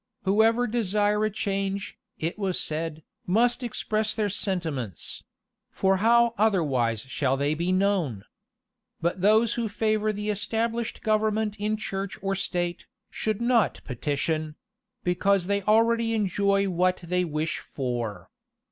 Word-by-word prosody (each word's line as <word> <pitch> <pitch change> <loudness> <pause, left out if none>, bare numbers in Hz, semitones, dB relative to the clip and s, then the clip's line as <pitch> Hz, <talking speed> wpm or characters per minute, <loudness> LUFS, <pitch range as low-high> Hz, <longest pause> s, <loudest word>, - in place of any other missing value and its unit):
Whoever 220 +5 +3
desire 210 -2 +1
a - - +1
change, 195 -1 -2 0.2
it 165 +6 -3
was 190 -3 0
said, 160 0 -3 0.2
must 240 +7 +2
express 215 -2 -1
their 210 -3 0
sentiments; 160 - -3 0.5
for 190 0 +2
how 235 +3 +4
otherwise 140 - +2
shall 135 0 -1
they 145 +2 +1
be 170 +3 -1
known? 185 - +1 0.8
But 170 +2 -1
those 215 +3 +4
who 230 -2 -2
favor 215 +1 +1
the 210 0 -2
established 225 +3 -2
government 215 -1 +1
in 215 +1 0
church 195 -2 -4
or 195 0 0
state, 175 -2 -2 0.2
should 215 0 -2
not 235 - +2
petition; 150 +4 -2 0.5
because 180 +1 +2
they 200 +1 0
already 225 +2 +3
enjoy 200 -1 +1
what 185 0 +1
they 180 +1 0
wish 155 -1 -2
for. 120 - -4
195 Hz, 130 wpm, -26 LUFS, 170-215 Hz, 0.8 s, how